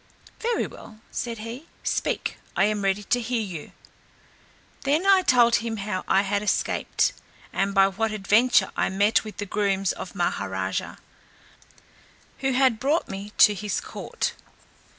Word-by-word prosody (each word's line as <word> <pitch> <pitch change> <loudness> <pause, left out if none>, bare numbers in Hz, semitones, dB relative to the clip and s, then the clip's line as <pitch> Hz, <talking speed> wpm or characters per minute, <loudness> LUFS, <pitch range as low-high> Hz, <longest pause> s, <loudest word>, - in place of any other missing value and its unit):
"Very 470 +1 0
well," 215 - -12
said 235 -1 -3
he, 230 +8 -8 0.2
"speak, - - -1 0.2
I - - +4
am 210 0 +1
ready 195 +1 +1
to 245 +4 +1
hear 235 -1 -1
you." 175 -7 -7 1.1
Then 300 +6 +1
I 390 -1 +6
told 240 -7 +5
him 230 -1 -3
how 195 -2 -3
I 195 +1 +4
had 200 0 0
escaped, 210 - 0 0.4
and 195 +1 0
by 195 0 +6
what 220 +3 -1
adventure 215 +1 +3
I - - +1
met 200 +3 +2
with 215 -1 -9
the 205 - -3
grooms 195 -1 0
of - - -8
Maha - - -1
raja, - - -3 1.4
who 265 -1 0
had 255 -3 +3
brought 290 +6 +1
me 195 +2 -6
to 210 - +7
his 205 +1 -2
court. - - -4
215 Hz, 150 wpm, -25 LUFS, 195-245 Hz, 1.4 s, to